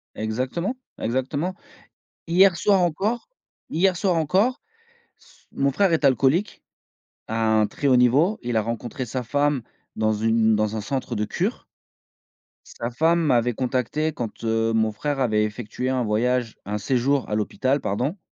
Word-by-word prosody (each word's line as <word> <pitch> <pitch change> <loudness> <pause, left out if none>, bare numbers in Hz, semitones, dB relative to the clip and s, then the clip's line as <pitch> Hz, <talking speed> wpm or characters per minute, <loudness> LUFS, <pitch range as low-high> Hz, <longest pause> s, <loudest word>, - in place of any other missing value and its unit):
Exactement, 130 - -2 0.2
exactement. 140 +9 -2 0.7
Hier 180 +1 +5
soir 195 +2 +3
encore 195 - -1 0.4
hier 180 +3 +2
soir 185 -1 +1
encore, 190 - +1 0.6
s - - -24
mon 140 0 +1
frère 195 +4 +2
est 160 -3 +2
alcoolique, 140 - +2 0.6
à 115 - -3 0.2
un 105 - +2
très 140 - -3
haut 130 - +5
niveau. 140 - +3
Il 120 -1 -1
a 110 - +3
rencontré 120 +3 -4
sa 125 +2 -3
femme 145 +1 +1 0.3
dans 110 0 +1
une 110 +1 +2
dans 105 0 0
un 110 - -2
centre 130 +1 -3
de 105 0 -1
cure. - - -2 1.0
Sa 115 - -5
femme 165 +7 +2
m'avait 125 -4 +2
contacté 130 +5 -1
quand, 115 -5 -6
heu, 115 0 +1
mon 110 -1 +2
frère 145 +6 -3
avait 110 -5 +2
effectué 105 +3 -4
un 130 -1 0
voyage 120 +2 0
un 105 +2 -3
séjour 130 +4 0
à 105 - -1
l'hôpital, 130 +6 0
pardon. 130 - -2
130 Hz, 155 wpm, -23 LUFS, 115-155 Hz, 1.0 s, Hier